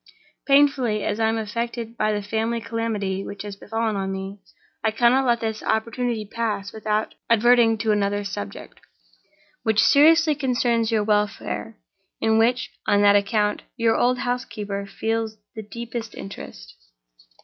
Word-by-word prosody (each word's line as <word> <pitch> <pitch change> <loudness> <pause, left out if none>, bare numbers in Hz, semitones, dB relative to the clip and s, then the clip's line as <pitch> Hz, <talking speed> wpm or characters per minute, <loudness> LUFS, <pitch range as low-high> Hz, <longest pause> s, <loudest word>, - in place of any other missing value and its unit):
"Painfully 275 -6 +3
as 205 - -2
I 220 0 +3
am 225 - 0
affected 230 +1 -4
by 215 -2 +1
the 205 -1 -2
family 225 +3 -1
calamity 220 -4 -2
which 200 0 -7
has 205 -1 -7
fallen 225 +1 -2
on 195 -1 -2
me, 195 +1 -6 0.4
I 220 - +3
cannot 240 +4 +3
let 235 -1 +2
this 220 -1 -3
opportunity 230 0 -1
pass 205 -2 -3
without 215 0 -1 0.2
adverting 230 0 +5
to 220 0 0
another 205 0 0
subject 100 - -7 0.8
which 220 -1 +1
seriously 320 +2 +6
concerns 245 -5 0
your 220 -2 +2
welfare, 210 +1 -1 0.4
and 225 - +1
in 220 - +4
which 245 +3 +1 0.2
(on 205 0 +4
that 205 0 +6
account) 210 +1 +1 0.2
your 230 -2 +2
old 250 +1 +2
housekeeper 215 -5 -3
feels 225 +2 -2 0.2
the 220 - -5
deepest 230 +1 -7
interest. 70 - -9
220 Hz, 150 wpm, -23 LUFS, 205-235 Hz, 0.8 s, seriously